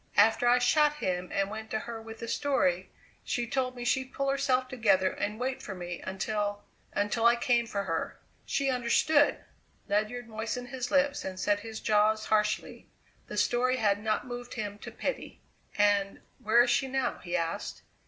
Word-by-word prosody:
After 225 +3 +5
I 245 +1 +6
shot 295 +4 +3
him 185 -9 -2
and 195 0 0
went 220 0 -6
to 220 - -1
her 230 -1 -6
with 225 +1 -10
the 230 - -4
story 190 -11 +1 0.3
she 240 - -1
told 255 +1 -1
me 245 -1 -6
she'd 260 +2 0
pull 275 0 -1
herself 265 -2 +1
together 200 -7 +2
and 210 +2 -3
wait 255 +1 -2
for 200 - -6
me 175 -1 -6
until 205 +2 -2 0.3
until 210 +3 +2
I 235 - +6
came 235 -1 +1
for 200 -2 -2
her. 165 -4 -3 0.2
She 275 -1 0
understood!" 260 +4 +2 0.4
Ledyard 215 +4 -1
moistened 225 +3 -4
his 250 -1 -4
lips 285 +1 +2
and 185 -1 -5
set 205 0 +2
his 220 +1 -7
jaws 215 +1 +2
harshly. 210 0 0 0.4
The - - -6
story 255 +1 +2
had 205 -3 +2
not 215 -1 0
moved 245 -1 -7
him 205 -3 -4
to - - -8
pity. - - -4 0.4
"And 205 -1 +2 0.2
where 230 +3 +5
is 240 - +1
she 245 +2 +2
now?" 265 -1 -1
he 175 -1 -4
asked. 165 -1 -3
225 Hz, 180 wpm, -29 LUFS, 205-250 Hz, 0.4 s, I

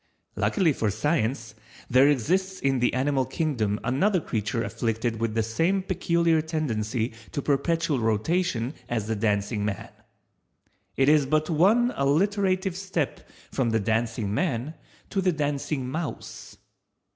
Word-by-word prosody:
Luckily 180 -7 +2
for 110 -4 0
Science, 115 - -1 0.3
there 130 +3 +5
exists 185 - 0
in 135 -1 +1
the 125 - +2
animal 135 +1 +1
Kingdom 125 -6 -1
another 175 - +2
creature 115 -4 -2
afflicted 115 0 -2
with 115 -1 -1
the 115 - +2
same 165 - 0
peculiar 170 -3 +1
tendency 120 -8 -2 0.2
to - - -1
perpetual 150 +1 +1
rotation 120 - 0 0.2
as 115 -4 -1
the 110 +1 -1
Dancing 105 0 0
man. 105 -2 -3 1.1
It 135 - +3
is 150 -2 +4
but 155 +3 +1
one 215 +10 +4
alliterative 185 +5 +1
step 185 -6 -3 0.2
from 130 -4 0
the 110 0 +1
Dancing 110 0 -1
man 135 0 -1 0.4
to 195 - 0
the 185 -1 +2
Dancing 145 -3 -2
mouse. 155 +4 -6
135 Hz, 135 wpm, -26 LUFS, 115-170 Hz, 1.1 s, there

